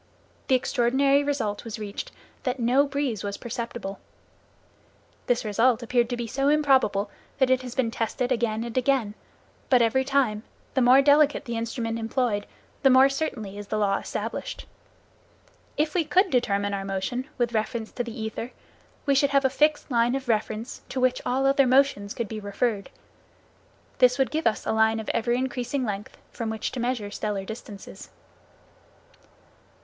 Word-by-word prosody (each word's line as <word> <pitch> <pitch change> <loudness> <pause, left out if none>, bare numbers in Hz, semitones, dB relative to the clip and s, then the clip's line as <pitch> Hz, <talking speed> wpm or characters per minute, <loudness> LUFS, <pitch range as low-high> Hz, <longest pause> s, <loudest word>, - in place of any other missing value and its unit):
The 265 - +4
extraordinary 270 +3 +2
result 240 -8 -2
was 230 -2 -6
reached 215 - -6 0.3
that 255 -1 -2
no 255 +5 +3
breeze 275 -7 -2
was 200 0 -4
perceptible. 235 -4 -5 1.3
This 240 -2 +1
result 230 +3 +2
appeared 240 0 +1
to 245 - -2
be 240 - -3
so 275 +5 0
improbable 265 -9 +3 0.3
that 265 -2 +3
it 260 0 +3
has 250 -1 -8
been 250 -4 +1
tested 240 +3 -2
again 230 -2 0
and 235 -1 -7
again, 255 -4 +1 0.6
but 255 - +6
every 265 +4 +2
time, 265 -6 +1 0.3
the 265 - +2
more 255 +3 +6
delicate 290 0 +4
the 235 -2 -4
instrument 230 0 -3
employed, 225 -2 -1 0.3
the 270 - +5
more 260 +1 +7
certainly 225 -9 -4
is 205 - -8
the 215 - -2
law 200 -2 +1
established. - - -5 1.1
If 300 0 +1
we 355 - +2
could 370 +5 +2
determine 205 -5 +1
our 195 -1 -2
motion 195 +8 -3
with 240 -1 0
reference 220 +1 -2
to 245 - -3
the 235 0 -8
ether, 220 +2 -5 0.5
we 280 - +3
should 275 +1 +3
have 275 -1 +2
a 265 - +3
fixed 295 +1 +1
line 240 +1 +2
of 270 -1 -4
reference 220 +1 -2
to 265 - -3
which 255 0 +2
all 260 +2 +1
other 275 0 +4
motions 255 -6 +2
could 235 - -3
be 215 +1 -5
referred. 205 0 -2 1.1
This 250 0 +5
would 270 -1 +1
give 315 -2 0
us 220 - -1
a - - 0
line 220 0 +3
of 220 - -5
ever 240 +1 0
increasing 255 +1 -1
length 205 -1 -5
from 230 -2 -4
which 220 0 -3
to 255 - -5
measure 240 -4 -2
stellar 205 -2 -3
distances. 215 -1 -9
245 Hz, 170 wpm, -26 LUFS, 220-270 Hz, 1.3 s, more